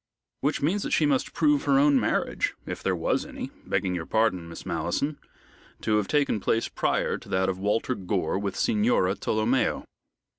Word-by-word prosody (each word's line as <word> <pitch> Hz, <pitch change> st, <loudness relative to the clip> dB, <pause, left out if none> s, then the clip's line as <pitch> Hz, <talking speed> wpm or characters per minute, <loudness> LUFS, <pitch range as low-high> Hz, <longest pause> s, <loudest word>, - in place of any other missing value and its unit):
"Which 145 Hz, +1 st, -1 dB
means 185 Hz, +8 st, +1 dB
that -, -, -3 dB
she 155 Hz, -, +3 dB
must 140 Hz, -3 st, +1 dB
prove 150 Hz, -3 st, +2 dB
her 140 Hz, -1 st, +4 dB
own 140 Hz, -1 st, +5 dB
marriage, 105 Hz, -, 0 dB
if -, -, -5 dB
there -, -, 0 dB
was -, -, 0 dB
any -, -, -7 dB, 0.2 s
begging 95 Hz, -, 0 dB
your 85 Hz, -2 st, -4 dB
pardon, 95 Hz, -7 st, +1 dB
Miss 85 Hz, -, -9 dB
Malleson 145 Hz, +1 st, -2 dB, 0.6 s
to 110 Hz, -1 st, +2 dB
have 105 Hz, -2 st, 0 dB
taken 145 Hz, -7 st, +1 dB
place 115 Hz, +3 st, 0 dB
prior -, -, 0 dB
to -, -, -15 dB
that 95 Hz, 0 st, +1 dB
of 95 Hz, 0 st, -3 dB
Walter 105 Hz, +5 st, 0 dB
Gore 95 Hz, -2 st, -1 dB
with 100 Hz, -1 st, -3 dB
Signora 105 Hz, -3 st, +2 dB
Tolomeo." 110 Hz, +5 st, 0 dB
110 Hz, 180 wpm, -26 LUFS, 95-140 Hz, 0.6 s, own